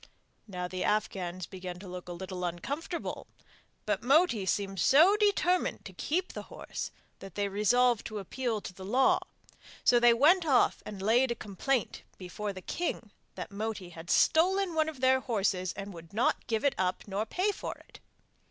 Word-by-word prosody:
Now 180 -3 -4
the 185 0 -4
Afghans 185 -4 -1
began 180 -1 -7
to 190 +2 -10
look 180 0 -8
a - - -4
little 185 +1 -6
uncomfortable, 280 - -4 0.6
but - - 0
Moti 265 - +3
seemed 195 -1 -1
so 320 - +6
determined 405 -4 +1
to - - -9
keep 360 +5 -2
the - - -5
horse - - -6 0.3
that 195 -2 -11
they 205 -1 0
resolved 230 +4 +2
to 215 - -6
appeal 220 +2 -3
to 185 - -8
the 190 - -11
law, 250 +7 +3 0.6
so 240 - +5
they 240 0 +6
went 330 +9 +5
off 275 -6 +3
and 200 -2 -7
laid 240 +5 +4
a 235 - -1
complaint 220 +5 -2 0.2
before 200 +3 -5
the 185 -1 -9
king 350 - -3 0.2
that - - -6
Moti 205 -3 -4
had 170 0 -11
stolen 370 +3 +3
one 315 -1 +2
of 290 -5 -10
their 260 0 +4
horses 195 -7 0
and 200 0 -7
would 165 0 -12
not 225 +4 +1
give 225 +2 -1
it 280 - +4
up 185 0 0
nor 200 +1 -1
pay 370 - +1
for - - -6
it. - - -16
215 Hz, 180 wpm, -30 LUFS, 185-270 Hz, 0.6 s, so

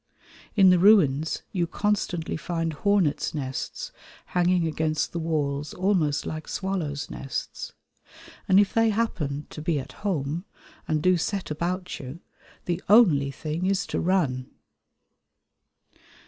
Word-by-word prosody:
In 190 -3 +7
the 180 - +4
ruins 160 -7 +4
you 175 -3 0
constantly 180 -3 -1
find 165 0 -2
hornets' 185 -3 +1
nests 135 -3 -4 0.3
hanging 180 -1 +2
against 155 -1 -1
the 170 - -3
walls 150 -3 -2
almost 180 -7 +1
like 155 0 -5
swallows' 175 -7 -3
nests, 135 - -5 0.7
and 190 - +6
if 205 - +2
they 225 0 +4
happen 155 -10 -1
to 155 - -7
be 155 -1 0
"at 130 - -8
home" 165 -5 -1 0.4
and 155 -1 0
do 185 -1 +4
set 190 +1 -2
about 180 +4 -3
you, 135 +4 -8 0.5
the 175 0 -1
only 175 -11 +6
thing 155 +5 -3
is 195 0 +1
to - - -2
run. 145 -9 0
165 Hz, 130 wpm, -26 LUFS, 150-190 Hz, 0.7 s, In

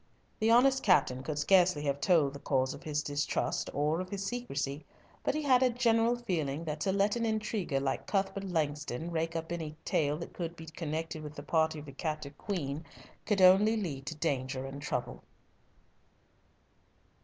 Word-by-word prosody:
The 220 - +2
honest 265 +3 +5
captain 130 - +3
could 145 +2 -4
scarcely 175 0 +4
have 140 -1 -1
told 155 -6 +3
the 140 - -8
cause 130 -2 0
of - - -10
his 150 -1 -2
distrust 145 0 -1
or 150 +4 0
of 185 - -6
his 195 0 -4
secrecy, 150 - -3 0.4
but - - 0
he 305 - -1
had 260 -3 +5
a 255 - +5
general 235 -1 +3
feeling 165 - -2
that 155 -1 -4
to 190 - +1
let 200 +2 +2
an 235 - -1
intriguer 215 -9 -1
like 135 -1 -2
Cuthbert 195 0 -1
Langston 150 -3 -2
rake 165 0 -1
up 165 0 -4
any 160 -3 -4
tale 150 -1 +1
that 170 - -8
could 170 -1 -4
be 160 - -10
connected 160 0 -4
with 150 0 -8
the - - -7
party 160 -1 +1
of 150 - -8
the 140 - -9
captive 150 0 -4
queen, 155 -6 -3 0.4
could 200 -3 +3
only 200 +5 +6
lead 145 -9 -4
to 160 - -3
danger 135 -4 -2
and 135 +1 -7
trouble. - - -3
160 Hz, 180 wpm, -31 LUFS, 145-195 Hz, 0.4 s, only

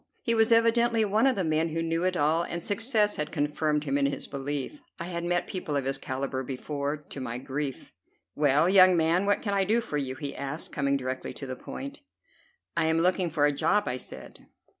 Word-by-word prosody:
He 230 - +2
was 225 0 +3
evidently 230 0 +4
one 215 +5 +3
of 265 - +3
the 195 - 0
men 160 0 +1
who 165 +1 -2
knew 165 +2 0
it 185 -1 +1
all, 155 +2 +3
and 170 0 -4
success 210 0 +1
had 150 0 -3
confirmed 150 0 0
him 140 -1 0
in 140 - +3
his 140 - -3
belief. 145 - -4 0.2
I - - -3
had 170 -1 -4
met 175 0 0
people 170 -6 -4
of 140 -2 0
his 135 0 0
calibre 130 0 -3
before, 140 +3 -3
to 145 -2 -10
my 120 -1 -4
grief. 135 +1 -5 0.4
"Well, 145 +2 +3
young 185 -1 +7
man, 170 +4 +2
what 205 - +2
can 200 - -1
I 195 -1 +3
do 215 +5 +2
for 230 -11 -3
you?" 130 -2 -3
he 140 +1 -6
asked, 140 +3 -4
coming 140 -1 +1
directly 130 0 -4
to 140 - -6
the 130 -1 -5
point. 280 - -8 0.7
"I - - +2
am 160 0 +2
looking 180 +1 +2
for 150 -2 +2
a 145 - +4
job," 205 +8 +2
I 125 - -2
said. - - -9
160 Hz, 220 wpm, -28 LUFS, 140-195 Hz, 0.7 s, young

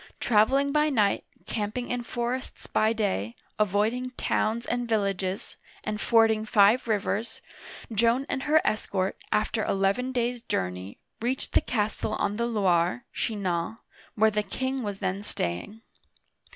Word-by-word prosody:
Traveling 260 +6 +3
by 300 +1 +3
night, 210 -8 +2 0.2
camping 215 +3 -3
in 245 0 -1
for 240 0 -2
ests 260 0 -6
by 215 +1 +2
day, 190 - -1 0.2
avoiding 215 +5 +1
towns 225 +2 0
and 245 -1 -2
villages, 195 -3 -1 0.3
and 210 0 -3
fording 225 -2 +4
five 215 +3 +4
rivers, 220 +1 -1 0.5
Joan 235 +5 +3
and 265 - -2
her 315 +1 +6
escort, 195 -3 0 0.2
after 215 +1 +1
eleven 195 +6 +1
days' 245 -1 -1
journey, 90 - -3 0.2
reached 250 +3 -2
the - - +5
castle 215 -3 -1
on 205 +1 -1
the 235 0 0
Loire 190 -1 +1
(Chinan) 200 -2 -2 0.4
where 220 0 +4
the 210 0 +1
king 260 +6 -3
was 205 -4 -3
then 195 +1 -2
staying. 205 - -3
215 Hz, 140 wpm, -27 LUFS, 200-240 Hz, 0.5 s, her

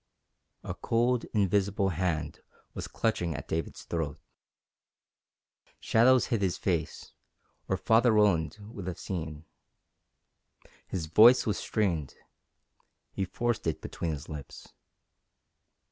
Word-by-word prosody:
A - - -4
cold, 120 +1 +1
invisible 100 -1 +1
hand 85 -3 -2 0.3
was - - -5
clutching 90 -8 -1
at 70 - -7
David's 80 -1 -4
throat. 80 -4 -3 1.6
Shadows 125 +3 +4
hid 110 - +1
his 95 -3 0
face, 85 -5 -2 0.5
or 95 - 0
Father 115 +5 +4
Roland 100 -6 +3
would 100 -3 -8
have 90 - -4
seen. 80 -4 -5 1.4
His 85 -4 -3
voice 115 +10 +7
was 105 - -1
strained. 85 - -1 1.0
He 95 - -2
forced 120 +1 -2
it 80 - -1
between 85 - -4
his 75 0 -7
lips. 75 -3 -9
95 Hz, 110 wpm, -29 LUFS, 80-110 Hz, 1.6 s, voice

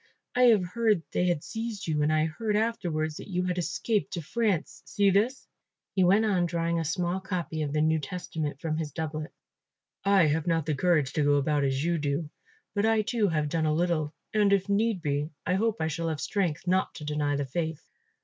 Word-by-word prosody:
I 250 0 +5
have 215 -6 +5
heard 210 -1 +1
they 180 - +1
had 170 -4 0
seized 225 -2 -5
you 155 -2 0
and 150 +1 +2
I 155 0 +3
heard 210 +7 -2
afterwards 170 -9 -1
that - - -9
you 180 -2 -1
had 180 0 -1
escaped 210 +4 -1
to 170 - -3
France, 205 -1 -1
see 200 -1 +2
this," 220 +8 +1 0.5
he 190 - +3
went 200 +5 +4
on, 185 -5 +2
drawing 170 0 0
a - - -1
small 175 +3 -1
copy 180 -4 -3
of 145 -2 -2
the 150 +1 +1
New 160 0 +2
Testament 155 -3 -4
from 155 0 -2
his 155 -2 -3
doublet. 155 +1 -4 0.7
"I 195 -3 +5
have 155 +2 0
not 165 -3 +1
the 155 - 0
courage 150 -3 +2
to 150 - +1
go 145 0 +4
about 145 +1 +1
as 135 0 0
you 170 0 +1
do; 145 +1 -2 0.4
but 205 0 0
I 220 -1 +3
too 220 -1 +1
have 155 -4 0
done 160 +1 0
a 155 - +2
little, 165 -3 0 0.2
and, 210 -2 +3
if 200 -1 +2
need 205 -2 +1
be, 145 0 -1 0.2
I 180 - +1
hope 220 +3 +1
I 160 - 0
shall 165 +1 -2
have 155 -2 -3
strength 175 +1 -1
not 185 +1 +1
to 150 - -7
deny 150 -1 0
the 140 0 -1
faith." 160 +3 -4
170 Hz, 215 wpm, -28 LUFS, 155-200 Hz, 0.7 s, I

